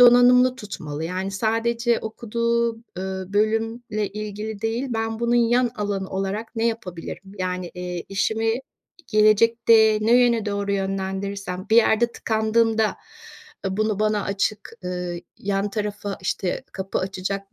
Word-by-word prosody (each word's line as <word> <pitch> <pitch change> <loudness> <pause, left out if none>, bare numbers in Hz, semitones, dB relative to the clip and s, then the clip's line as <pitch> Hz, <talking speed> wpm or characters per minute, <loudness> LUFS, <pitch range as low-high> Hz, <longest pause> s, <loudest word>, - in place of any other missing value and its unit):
donanımlı 245 +1 +7
tutmalı 160 - -6
yani 185 +3 -2
sadece 230 +3 +1
okuduğu, 235 +1 -1 0.2
ııı, 190 0 -4
bölümle 220 0 0
ilgili 210 0 -5
değil, 230 +4 -1
ben 225 -1 -2
bunun 235 0 +2
yan 240 +1 +3
alanı 200 -2 -2
olarak 195 +5 -3
ne 225 +1 +2
yapabilirim, 190 -4 -5
yani, 180 -1 -2
eee, 180 -1 -5
işimi 220 +3 +1 0.5
gelecekte 220 0 +5
ne 225 +2 +3
yöne 235 -3 +1
doğru 200 0 -1
yönlendirirsem 195 0 -3
bir 225 - +5
yerde 235 +1 +4
tıkandığında, 220 0 +1 0.7
ııı, 190 0 -2
bunu 215 -1 +1
bana 215 -1 +1
açık 200 +2 -2
ııı, 180 -1 -3 0.2
yan 200 +1 -1
tarafa, 205 -1 -3
işte, 185 -1 -2
kapı 190 0 -3
açacak 195 +1 -4
210 Hz, 125 wpm, -23 LUFS, 195-225 Hz, 0.7 s, donanımlı